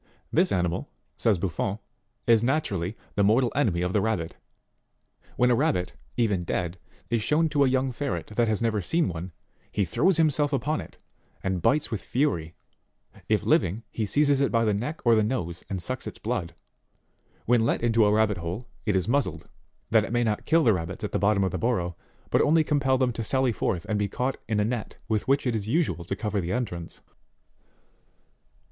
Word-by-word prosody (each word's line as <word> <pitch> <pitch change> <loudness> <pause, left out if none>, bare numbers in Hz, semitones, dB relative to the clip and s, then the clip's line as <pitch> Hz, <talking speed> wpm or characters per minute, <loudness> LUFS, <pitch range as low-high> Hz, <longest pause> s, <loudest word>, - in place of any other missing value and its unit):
This - - +3
animal, 90 -3 -1 0.3
says 110 -4 +2
Buffon, 95 +3 -2 0.5
is 115 -1 +4
naturally, 110 - -1 0.2
the 100 - +2
mortal 115 +4 +3
enemy 100 -12 +1
of 90 +1 -1
the 105 - +3
rabbit: 95 -7 -1 1.0
when 125 0 +3
a - - +4
rabbit, 90 -5 0 0.2
even 105 -7 +1
dead, 85 +1 -3 0.3
is 115 -2 +2
shown 155 +7 +2
to 145 -1 +3
a 135 - +3
young 130 0 +1
ferret 140 +3 -3
that 120 0 +2
has 110 +1 +1
never 110 -3 +1
seen 165 - +1
one, 85 +1 -5 0.4
he 100 - 0
throws 170 - +2
himself 150 -2 +2
upon 150 +4 0
it, - - -12 0.5
and 95 -2 -1
bites 150 - +2
with 110 - -2
fury; 85 - -1 0.7
if - - +2
living, 105 +7 +2
he 110 -2 -2
seizes 145 +2 +3
it 140 - +2
by 115 -1 +2
the 105 - +2
neck 125 +11 -3
or 120 - +6
the 110 - +4
nose 90 -7 -3
and 95 -3 0
sucks 130 0 -4
its - - -7
blood. 100 -8 -3 0.9
When 120 0 +4
let 115 - 0
into 115 -1 +4
a 105 - +3
rabbit 105 -1 +2
hole, 90 +8 -5 0.2
it 105 - +2
is 95 0 +1
muzzled, 140 +4 -1 0.4
that 110 -1 +5
it 110 - -5
may 120 0 +2
not 110 -2 -1
kill 165 0 +4
the 115 - +5
rabbits 90 +2 -4
at 105 - -3
the - - 0
bottom 100 0 +3
of 95 - 0
the - - -3
burrow, 90 -8 0 0.4
but - - +4
only 160 +1 +4
compel 140 -3 +2
them 125 -2 +1
to 115 - -4
sally 130 +2 +1
forth 90 -5 -2
and 105 -1 0
be 105 - +1
caught 125 +6 -2
in 110 -1 0
a 105 - +2
net 115 -2 -3
with 110 -2 -1
which 135 +1 +2
it 120 -3 +1
is 105 -2 -3
usual 115 - 0
to 95 - -3
cover 105 -1 -2
the 85 +1 -3
entrance. 100 -9 -4
110 Hz, 200 wpm, -26 LUFS, 95-130 Hz, 1.0 s, or